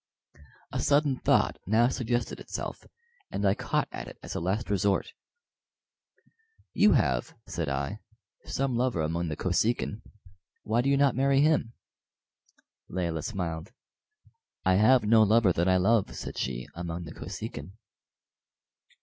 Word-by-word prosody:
A - - -2
sudden 145 -2 +2
thought - - +2
now 110 +4 +4
suggested 125 -2 -2
itself, - - -6 0.4
and 100 - -2
I 95 - +4
caught - - -1
at - - -6
it - - -11
as - - -6
a - - -2
last 95 +6 -2
resort. 100 0 +1 1.6
"You 210 - +5
have," 65 - +1
said 80 -4 -3
I, 70 0 -3 0.4
"some 135 -2 -1
lover 120 -8 +1
among 85 +2 -1
the 75 - -3
Kosekin. 105 +5 0 0.6
Why 115 +3 +1
do 135 - 0
you 140 - +3
not 140 -2 +3
marry 135 +1 +3
him?" 150 -6 +2 1.2
Layelah 85 -4 -2
smiled. 90 +1 -4 0.9
"I 95 - +4
have 120 +4 +5
no 110 +1 +5
lover 110 -3 +4
that 85 +2 +1
I 95 - +4
love," 105 +3 +2
said - - -6
she, 65 -1 -3
"among 85 0 -5
the 80 - -9
Kosekin." 75 +6 -7
100 Hz, 140 wpm, -28 LUFS, 85-120 Hz, 1.6 s, You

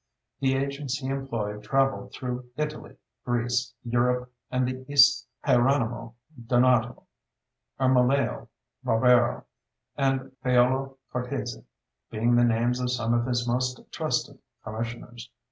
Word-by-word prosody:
The 135 -1 +2
agents 140 -1 -2
he 135 -2 -5
employed 115 -6 -3
travelled 135 +4 0
through 125 -1 -5
Italy, 150 0 -4 0.3
Greece, 120 0 -1
Europe, 125 +1 0 0.2
and 125 0 0
the 130 0 -5
East 145 -2 +6 0.2
Hieronymo 120 -2 +1 0.3
Donato, 120 -1 +3 0.8
Ermolao 130 +1 +2 0.4
Barbaro, 120 +2 +3 0.5
and 135 -1 0
Paolo 130 +1 +2 0.2
Cortesi 125 -1 -4 0.4
being 115 +2 +1
the 120 - +5
names 120 +1 +2
of 125 0 -1
some 120 -2 0
of 120 +1 +1
his 120 -1 0
most 125 +1 0
trusted - - -2 0.2
"commissioners." 115 +2 -6
125 Hz, 110 wpm, -26 LUFS, 120-135 Hz, 0.8 s, East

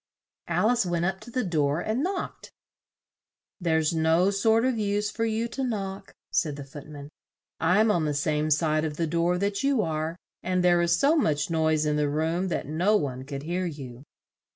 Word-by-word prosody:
Al 220 - +2
ice 245 -2 +2
went 175 -2 -1
up 190 +1 -1
to 215 - -12
the 255 +1 -1
door 155 -5 +1
and 220 +7 -1
knocked. 370 +3 -4 1.1
"There's 160 -3 +1
no 165 +4 +3
sort 220 +4 +3
of 255 -3 0
use 205 0 0
for 225 - -1
you 225 +1 -1
to 270 - -4
knock," 195 -6 -4 0.2
said 150 -4 0
the 145 - -7
Foot 140 +2 -11
man, 145 -1 -10 0.5
"I'm 205 +6 +3
on 170 -6 +1
the 150 -1 -1
same 150 +1 0
side 155 0 +2
of 155 -1 -3
the 170 - 0
door 170 +2 +1
that 200 +1 -1
you 275 -5 +2
are, 160 0 -2 0.3
and 185 0 0
there 175 -1 +4
is 170 0 +2
so 285 +3 +4
much 155 - +1
noise 160 -1 +2
in 150 0 +1
the 150 -1 +1
room 160 +5 0
that 175 - -2
no 175 +8 +1
one 130 -5 -4
could 140 0 -6
hear 175 +3 -2
you." 135 -6 -8
170 Hz, 200 wpm, -26 LUFS, 155-205 Hz, 1.1 s, there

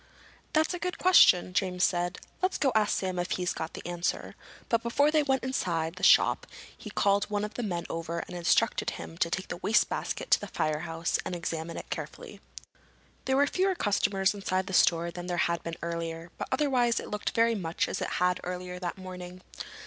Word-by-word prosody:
"That's 315 +2 +2
a 355 - -4
good 360 0 -3
question," 190 - +6
James 180 -1 0
said. 175 0 +1 0.2
"Let's 370 +1 +1
go 275 -3 +2
ask 215 -1 +2
Sam 185 -2 -2
if 175 - -2
he's 180 -1 -1
got 160 0 -5
the - - -9
answer." 175 0 -2 0.3
But 230 -1 +2
before 285 +6 +2
they 310 -1 +4
went 265 -2 0
inside 170 -10 -1
the - - -9
shop - - +5 0.3
he - - -9
called 200 0 +2
one 210 0 -2
of 210 - -9
his 240 -3 -2
men 175 -3 -3
over 165 0 -4
and 180 - -6
instructed 175 -1 +2
him 80 -1 -8
to - - +2
take - - -3
the - - -4
wastebasket - - 0
to - - +6
the - - -6
firehouse 165 +2 -1
and 180 - -4
examine 165 -1 -4
it - - -8
carefully. - - -7 0.8
There 265 0 +2
were 285 - +5
fewer 375 +5 +1
customers 200 - +1
inside 190 -2 -1
the 190 - -6
store 170 -1 +3
than 175 +1 -7
there 175 -1 -2
had 170 0 +1
been 165 0 -4
earlier, 165 0 -4
but - - -5
otherwise 260 -4 +2
it - - -8
looked 210 0 -3
very 230 0 +4
much 175 -6 -1
as - - -3
it - - -1
had 180 0 +2
earlier 180 0 -5
that 180 0 -4
morning. 185 -1 -9
185 Hz, 200 wpm, -29 LUFS, 170-230 Hz, 0.8 s, question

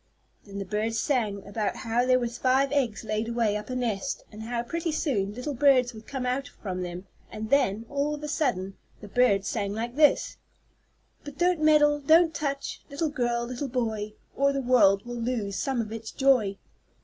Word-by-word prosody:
Then 200 0 -8
the 200 - -4
bird 215 +3 -1
sang 215 -7 0
about 205 +1 -2
how 235 +2 0
there 255 0 +5
were 245 -1 -1
five 255 +3 +1
eggs 255 -8 0
laid 215 +1 -2
away 230 -3 +1
up 210 +2 -5
in 255 - -2
a - - -2
nest, 225 +4 -2
and 215 0 -9
how, 235 +1 -3
pretty 335 +5 -2
soon, 210 - -1
little 250 +4 -4
birds 255 -2 +4
would 220 0 -12
come 265 -2 -4
out 255 +2 -1
from 185 -3 -6
them, 180 +1 -6 0.3
and 215 0 -6
then, 230 -6 +2
all 285 +2 -1
of 300 - -10
a - - -3
sudden, 215 -11 -1 0.2
the 210 - -10
bird 200 -3 +3
sang 200 -3 -2
like 235 +3 -4
this: 300 0 +3 0.9
"But 290 -1 -9
don't 355 -2 +2
meddle, 295 -1 +5
don't 320 +3 +5
touch, 280 -1 -3
Little 300 +3 -1
girl 240 -4 -1
little 250 +3 -4
boy, 220 -4 -2 0.2
Or 280 +1 +3
the 275 - -1
world 235 -6 +4
will 240 -1 -5
lose 225 -5 -2
some 265 -3 -1
of 215 -1 -6
its 225 0 -6
joy!" 250 -8 +2
240 Hz, 195 wpm, -27 LUFS, 215-280 Hz, 0.9 s, there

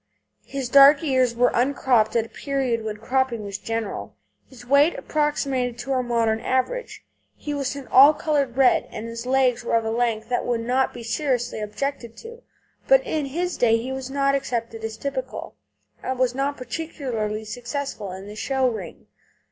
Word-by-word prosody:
His 275 -2 -4
dark 280 +3 +7
ears 260 -5 +2
were 245 +1 +3
uncropped 245 -3 +2
at 230 -1 +2
a - - -14
period 265 -5 -2
when 215 -1 -4
cropping 255 -1 -1
was 200 0 -5
general; 225 -1 -4 0.3
his 245 -2 -14
weight 280 +6 +4
approximated 275 -5 -1
to 245 +3 -5
our 260 -1 +2
modern 230 -2 +1
average. 260 - -2 0.3
He 295 - -5
was 280 -1 -2
an 280 -2 -7
all 275 +4 +8
coloured 280 -5 -1
red, 265 -2 +4
and 215 - -7
his 230 +1 -6
legs 255 -2 +2
were 235 - 0
of 225 -1 +1
a 220 - -1
length 225 -2 0
that 245 - 0
would 240 -2 -1
not 255 +3 +1
now - - -21
be 240 - -7
seriously 245 -1 -1
objected 235 +2 -4
to. 470 +1 -11 0.5
But - - +5
in 305 -3 -2
his 350 +6 -2
day 230 -2 +4
he 245 +3 -5
was 265 -1 -5
not 275 0 +1
accepted 230 -4 -3
as 220 0 -4
typical, 265 -1 -5 0.5
and 260 0 -3
he - - -12
was 255 -1 +2
not 275 +2 -1
particularly 240 -6 -4
successful 245 -2 -5
in 190 +1 -8
the 205 +1 -9
show 265 +3 0
ring. 210 -9 -6
250 Hz, 185 wpm, -23 LUFS, 230-275 Hz, 0.5 s, all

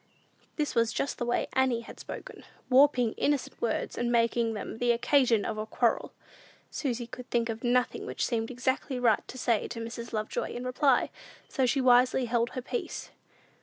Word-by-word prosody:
This 300 -2 -1
was 230 -1 +2
just 275 - -2
the 240 - -2
way 240 - +1
Annie 260 -3 +2
had 230 - -12
spoken; - - -8 0.3
warping 255 -3 +5
innocent 290 -2 -1
words, 230 - -1
and 240 0 0
making 230 -1 +2
them 215 +1 -6
the 245 0 +3
occasion 235 -3 +3
of 215 -1 -3
a 215 - -4
quarrel. 235 +1 +1 0.6
Susy 245 -4 -2
could 250 +1 -10
think 235 -1 +1
of 225 +1 -4
nothing 250 0 +1
which - - -1
seemed 225 -2 -1
exactly 260 +1 -1
right 235 -3 +3
to 255 - -9
say 235 -3 +1
to 230 - -6
Mrs. 230 +1 -6
Lovejoy 215 -1 -3
in 245 - -4
reply; 255 +1 +2 0.4
so 265 -3 +1
she 270 +2 +2
wisely 250 0 +4
held 235 0 +1
her 255 - -3
peace. 470 - -4
240 Hz, 180 wpm, -29 LUFS, 230-255 Hz, 0.6 s, warping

